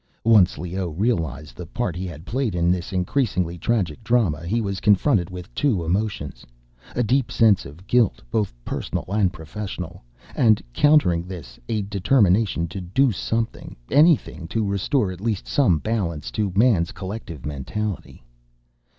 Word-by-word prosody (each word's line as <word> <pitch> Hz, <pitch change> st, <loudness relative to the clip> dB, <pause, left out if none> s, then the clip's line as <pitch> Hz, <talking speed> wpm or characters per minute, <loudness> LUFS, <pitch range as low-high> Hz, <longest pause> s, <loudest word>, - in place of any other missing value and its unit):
Once 105 Hz, -6 st, +5 dB
Leoh 90 Hz, +3 st, -3 dB
realized 80 Hz, -, -2 dB
the 90 Hz, -, -8 dB
part 90 Hz, -1 st, -2 dB
he 95 Hz, +1 st, -4 dB
had 80 Hz, -1 st, -9 dB
played 120 Hz, -5 st, -1 dB
in 85 Hz, 0 st, +2 dB
this 90 Hz, -1 st, -2 dB
increasingly 90 Hz, -2 st, 0 dB
tragic 90 Hz, -2 st, -1 dB
drama, 100 Hz, -9 st, +1 dB
he 115 Hz, +6 st, +1 dB
was 100 Hz, -4 st, -2 dB
confronted 100 Hz, -, +3 dB
with 90 Hz, -1 st, -9 dB
two 110 Hz, -, +1 dB
emotions—a 70 Hz, -, -4 dB
deep 130 Hz, +2 st, +1 dB
sense 110 Hz, -, +3 dB
of 80 Hz, +7 st, -14 dB
guilt, 120 Hz, -4 st, +2 dB
both 105 Hz, -3 st, 0 dB
personal -, -, -3 dB
and 100 Hz, -2 st, +2 dB
professional; 90 Hz, +1 st, -7 dB, 0.3 s
and, 110 Hz, -4 st, +4 dB
countering 145 Hz, -, +4 dB
this, 80 Hz, -10 st, -9 dB
a 105 Hz, -2 st, 0 dB
determination 100 Hz, -3 st, +2 dB
to 95 Hz, +4 st, -6 dB
do 120 Hz, +9 st, +2 dB
something, 115 Hz, +3 st, -3 dB, 0.2 s
anything, 145 Hz, -, +3 dB
to 110 Hz, +5 st, -1 dB
restore 100 Hz, +2 st, 0 dB
at 90 Hz, 0 st, -9 dB
least 110 Hz, -3 st, -1 dB
some 110 Hz, -, +3 dB
balance 85 Hz, -6 st, -2 dB
to 105 Hz, -3 st, -1 dB
man's 100 Hz, -6 st, +3 dB
collective 95 Hz, -, -7 dB
mentality. 75 Hz, -, -4 dB
95 Hz, 145 wpm, -23 LUFS, 85-115 Hz, 0.3 s, Once